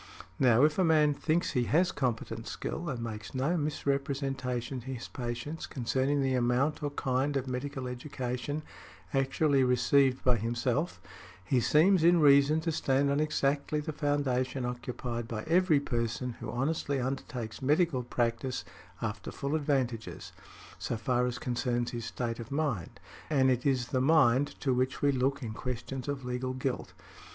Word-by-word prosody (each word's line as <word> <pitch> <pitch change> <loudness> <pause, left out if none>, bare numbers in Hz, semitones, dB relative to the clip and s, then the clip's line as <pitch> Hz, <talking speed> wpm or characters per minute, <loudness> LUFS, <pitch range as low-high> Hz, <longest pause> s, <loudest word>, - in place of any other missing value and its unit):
Now, 125 -1 +5
if 150 +4 +3
a - - +5
man 155 -3 +4
thinks 165 +4 0
he 125 -3 +1
has 175 +8 +3
competent 115 -3 -2
skill, 170 -1 -4
and 120 -4 -3
makes 110 0 -6
no 140 +7 +1
misrepresentation 135 -4 -2
to - - -16
his 130 -2 -5
patients 120 +6 -5
concerning 135 +2 0
the 135 -1 +1
amount 125 +4 +1
or 145 - -1
kind 135 0 0
of 135 -1 -3
medical 130 +1 -4
education 125 +3 -4 0.5
actually 135 +1 +2
received 130 +1 +3
by 125 -2 +4
himself, 120 - -1 0.5
he 125 +5 +2
seems 160 - +4
in 170 +1 +6
reason 145 +1 +6
to 165 0 -1
stand 140 -1 +1
on 140 - +1
exactly 150 -1 0
the 150 +1 -4
foundation 135 -3 0
occupied 120 -1 -4
by 110 -2 -4
every 170 -2 +4
person 120 -1 -2
who - - -6
honestly 140 +2 -1
undertakes 125 -4 -4
medical 150 0 +2
practice 120 +1 -2 0.4
after - - -4
full 140 +1 -3
advantages, 125 - -1 0.5
so 120 - -2
far 125 +2 +1
as 125 - -3
concerns 120 -2 -1
his 120 -1 -5
state 115 -1 -3
of 115 - -7
mind, 140 - -2 0.3
and 135 -4 +4
it 125 +2 0
is 130 -3 +1
the 130 - +1
mind 140 -2 +3
to 135 - +1
which 130 +2 -1
we 145 - +5
look 135 +1 0
in 110 -2 -4
questions 125 +2 -5
of 140 -2 -3
legal 125 +1 -2
guilt. 130 0 -3
130 Hz, 160 wpm, -30 LUFS, 125-145 Hz, 0.5 s, in